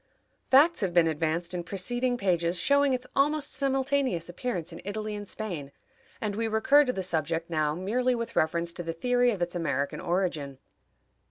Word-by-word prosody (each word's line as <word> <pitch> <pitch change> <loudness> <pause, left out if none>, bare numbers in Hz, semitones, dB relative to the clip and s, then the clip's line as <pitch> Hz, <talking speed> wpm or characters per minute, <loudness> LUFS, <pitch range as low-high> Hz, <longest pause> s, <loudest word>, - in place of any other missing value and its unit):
Facts 295 +4 +5
have 185 -3 -1
been 170 -1 +6
advanced 165 +2 -1
in 175 -1 -3
preceding 245 +7 -1
pages 175 -4 +1
showing 280 +7 +3
its 255 -1 -1
almost 295 +1 +2
simultaneous 270 - 0
appearance 175 -3 -4
in - - -9
Italy 215 +2 -4
and 205 -1 -6
Spain, 175 -12 -5 0.5
and 210 -4 -3
we 225 +1 -1
recur 225 +7 +4
to 250 - +1
the 190 - -3
subject 165 -1 -1
now 155 -2 +1
merely 245 +8 0
with 230 -1 -5
reference 170 +2 +1
to 175 - -5
the 165 -1 -4
theory 245 +7 +2
of 200 -7 -1
its 175 - -3
American 140 -5 -2
origin. 170 -6 -1
190 Hz, 175 wpm, -28 LUFS, 170-245 Hz, 0.5 s, been